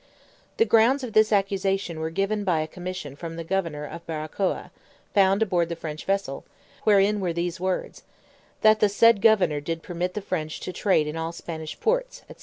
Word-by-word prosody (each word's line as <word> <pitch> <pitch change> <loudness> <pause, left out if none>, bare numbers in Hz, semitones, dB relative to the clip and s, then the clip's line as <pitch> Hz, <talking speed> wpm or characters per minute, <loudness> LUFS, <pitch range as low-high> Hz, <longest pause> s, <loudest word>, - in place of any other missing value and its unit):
The 455 - +4
grounds 245 - +4
of 235 -4 -5
this 215 0 +4
accusation 195 -3 0
were 160 0 -2
given 195 +5 -1
by 175 -5 +1
a 155 - -3
commission 180 -5 -7
from 165 +2 -7
the 165 - -5
governor 165 -4 -2
of 170 +3 -8
Barracoa, 160 +4 -3 0.4
found 195 +1 +4
aboard 175 -5 0
the 170 - -3
French 155 -2 -7
vessel, 195 -8 -1 0.4
wherein 205 0 +4
were 180 -3 -1
these 170 0 -3
words, 185 0 -3 0.6
"that 215 0 +5
the 210 - +4
said 230 +1 +5
governor 180 -10 +4
did 165 +2 -4
permit 180 +1 -3
the 210 - -2
French 160 -5 -3
to 185 - -5
trade 185 -7 +2
in 150 +1 -4
all 165 0 -3
Spanish 160 -2 -7
ports," - - -1
&c. - - -10
185 Hz, 190 wpm, -25 LUFS, 165-205 Hz, 0.6 s, that